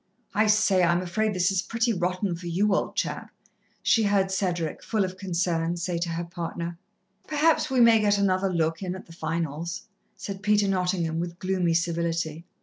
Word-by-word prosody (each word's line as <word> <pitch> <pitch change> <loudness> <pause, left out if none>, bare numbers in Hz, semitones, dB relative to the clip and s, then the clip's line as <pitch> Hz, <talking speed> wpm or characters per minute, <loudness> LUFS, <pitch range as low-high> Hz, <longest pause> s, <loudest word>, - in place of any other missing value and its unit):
"I 215 +2 +3
say, 210 -3 +4
I'm 175 +1 +3
afraid 215 +5 0
this 180 +1 +2
is 190 -2 +1
pretty 230 0 0
rotten 185 0 -1
for 175 +1 -8
you, 195 +4 +2
old - - -1
chap," - - -2 0.5
she 225 - +4
heard 200 -2 +2
Cedric, 175 -5 -1
full 215 -4 0
of 185 0 -6
concern, 175 -2 -1
say 175 0 -2
to 170 0 -2
her 165 +1 -2
partner. 170 0 -5 0.5
"Perhaps 310 +1 +2
we 260 -2 +3
may 230 -1 +7
get 205 -1 +3
another 195 -1 +1
look 165 -1 0
in 185 -1 -3
at 190 - -9
the 165 - -14
finals," 165 +1 -3 0.3
said 195 -1 -7
Peter 210 -1 +3
Nottingham, 180 -4 0
with 170 0 -4
gloomy 185 -3 0
civility. 170 -1 -1
180 Hz, 180 wpm, -26 LUFS, 170-200 Hz, 0.5 s, may